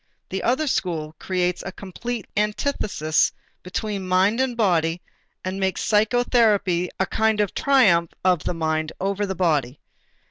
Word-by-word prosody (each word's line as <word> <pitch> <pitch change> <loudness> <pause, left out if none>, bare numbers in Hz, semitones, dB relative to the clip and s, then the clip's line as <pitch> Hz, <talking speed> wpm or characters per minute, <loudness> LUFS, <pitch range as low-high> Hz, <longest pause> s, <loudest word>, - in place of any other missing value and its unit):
The 190 0 -3
other 260 +6 +1
school 170 - -2
creates 180 -1 -1
a 190 - -5
complete 205 +4 -6
antithesis 210 - 0 0.3
between 195 +1 -4
mind 190 +5 +3
and 260 -2 0
body 170 -6 +2 0.5
and 185 +1 -3
makes 190 -1 -1
psychotherapy 210 -5 +2
a 190 - +3
kind 220 +1 +1
of 205 -3 +1
triumph 200 - +4 0.2
of 180 -4 +3
the 180 - -1
mind 160 -1 -1
over 200 +1 -1
the 190 - -3
body. 150 -7 0
190 Hz, 140 wpm, -23 LUFS, 175-220 Hz, 0.5 s, triumph